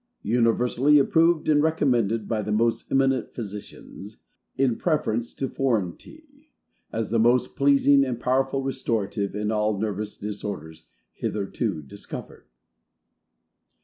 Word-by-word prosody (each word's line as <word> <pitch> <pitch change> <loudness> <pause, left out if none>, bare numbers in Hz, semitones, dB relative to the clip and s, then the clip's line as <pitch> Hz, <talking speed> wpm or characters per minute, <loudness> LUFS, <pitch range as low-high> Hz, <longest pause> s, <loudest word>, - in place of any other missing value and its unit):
UNIVERSALLY 120 +5 +3
APPROVED 160 +3 +3
and 150 -1 +4
RECOMMENDED 120 -9 +1
BY 110 -2 -1
THE 105 - -4
MOST 115 +2 0
EMINENT 135 -2 +1
PHYSICIANS, 105 -1 -8 0.4
IN 130 -3 +2
PREFERENCE 120 -8 -1
TO 135 - -3
FOREIGN 115 -11 0
TEA, 310 -1 -18 0.4
As 110 -2 -3
the 115 - +2
most 120 +2 +2
Pleasing 140 0 +4
and 125 -3 -3
POWERFUL 135 +2 0
RESTORATIVE, 110 -7 -2
IN 105 +1 -1
ALL 105 -1 0
NERVOUS 105 0 -3
DISORDERS, 95 -6 -6 0.3
HITHERTO 100 -3 -3
DISCOVERED. 70 - -9
115 Hz, 115 wpm, -25 LUFS, 105-135 Hz, 0.4 s, and